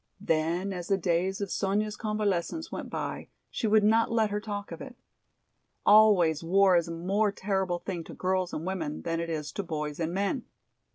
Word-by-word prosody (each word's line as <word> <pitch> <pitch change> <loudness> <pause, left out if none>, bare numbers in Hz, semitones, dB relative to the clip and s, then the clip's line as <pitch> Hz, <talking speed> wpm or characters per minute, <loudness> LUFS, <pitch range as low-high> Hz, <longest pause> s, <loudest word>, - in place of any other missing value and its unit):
Then 175 +2 0
as 175 -1 -5
the 195 - +2
days 185 +3 0
of 200 - -3
Sonya's 210 +2 0
convalescence 210 - -2
went - - -5
by - - -4 0.2
she 225 - -1
would 215 0 +4
not 225 +2 +3
let 220 -2 +2
her 210 0 -1
talk 205 -1 -5
of - - -7
it. - - -9 0.9
Always 195 -7 +6
war 190 +2 +4
is 170 -1 +2
a - - -5
more 195 +5 +1
terrible 190 -3 -1
thing 175 -2 -5
to - - -10
girls 185 -1 0
and 155 - -4
women 170 -6 -3
than 165 0 -1
it 170 0 -3
is 155 -2 -3
to - - -3
boys 150 -4 -4
and 165 0 -1
men. 200 +7 -1
190 Hz, 190 wpm, -28 LUFS, 170-205 Hz, 0.9 s, Always